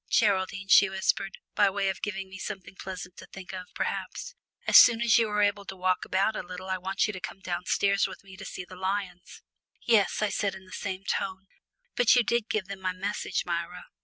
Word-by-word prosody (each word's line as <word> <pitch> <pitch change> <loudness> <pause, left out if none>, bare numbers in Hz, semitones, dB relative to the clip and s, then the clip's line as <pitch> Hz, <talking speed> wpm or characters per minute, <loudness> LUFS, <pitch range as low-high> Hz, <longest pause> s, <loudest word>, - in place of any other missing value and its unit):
"Geraldine," 190 -2 +2
she 200 0 +7
whispered, 190 0 -1 0.2
by 205 -1 +4
way 195 0 -1
of 190 - -2
giving 200 -2 -3
me 190 0 -10
something 195 -3 -6
pleasant 185 -1 -8
to - - -11
think 190 0 -10
of, 185 -1 -6
perhaps, - - -3 0.3
"as - - +1
soon 235 -1 +9
as 235 0 +5
you 225 -2 +2
are 210 0 +2
able 205 0 +1
to 190 +1 -7
walk 185 0 0
about 200 +3 +1
a - - -2
little 185 +1 -7
I 185 - -1
want 190 +2 0
you 210 - -2
to 190 - -6
come 195 - -7
downstairs 190 +2 +1
with 190 - -11
me 190 -1 -13
to 195 - -9
see 180 -1 -6
the 185 - -12
lions." 185 -1 -4 0.4
"Yes," 215 -2 +3
I 210 - +2
said 200 -1 -1
in 190 0 -12
the 185 - -17
same 190 -1 -4
tone, 190 0 -2 0.5
"but 245 0 +5
you 245 - +5
did 235 -1 0
give 210 -3 0
them 195 0 -8
my 185 -1 -1
message, 195 0 -2
Myra?" 175 +1 -4
190 Hz, 220 wpm, -28 LUFS, 185-205 Hz, 0.5 s, soon